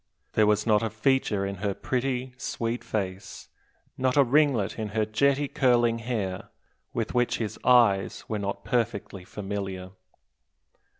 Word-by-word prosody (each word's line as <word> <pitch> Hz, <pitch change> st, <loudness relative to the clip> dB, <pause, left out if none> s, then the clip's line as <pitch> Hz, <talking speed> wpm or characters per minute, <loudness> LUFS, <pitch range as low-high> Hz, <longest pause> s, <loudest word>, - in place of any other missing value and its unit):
There 110 Hz, -1 st, +4 dB
was 105 Hz, 0 st, +2 dB
not 105 Hz, -2 st, +4 dB
a 115 Hz, -, -1 dB
feature 110 Hz, -2 st, +1 dB
in 100 Hz, 0 st, -4 dB
her 100 Hz, 0 st, -2 dB
pretty, 130 Hz, 0 st, -2 dB
sweet 115 Hz, -2 st, -3 dB
face, 95 Hz, -3 st, -5 dB, 0.5 s
not 130 Hz, +1 st, +1 dB
a 140 Hz, -, +8 dB
ringlet 130 Hz, -6 st, +2 dB
in 110 Hz, -, -2 dB
her 110 Hz, -, +3 dB
jetty 140 Hz, +6 st, +2 dB
curling 120 Hz, -4 st, +2 dB
hair, 110 Hz, -6 st, -3 dB, 0.4 s
with 115 Hz, -2 st, -3 dB
which 120 Hz, -1 st, +1 dB
his 110 Hz, -3 st, -4 dB
eyes 100 Hz, -7 st, +3 dB
were 110 Hz, -, -2 dB
not 100 Hz, 0 st, -4 dB
perfectly 110 Hz, -6 st, -2 dB
familiar. 95 Hz, -1 st, -5 dB
110 Hz, 140 wpm, -27 LUFS, 100-125 Hz, 0.5 s, a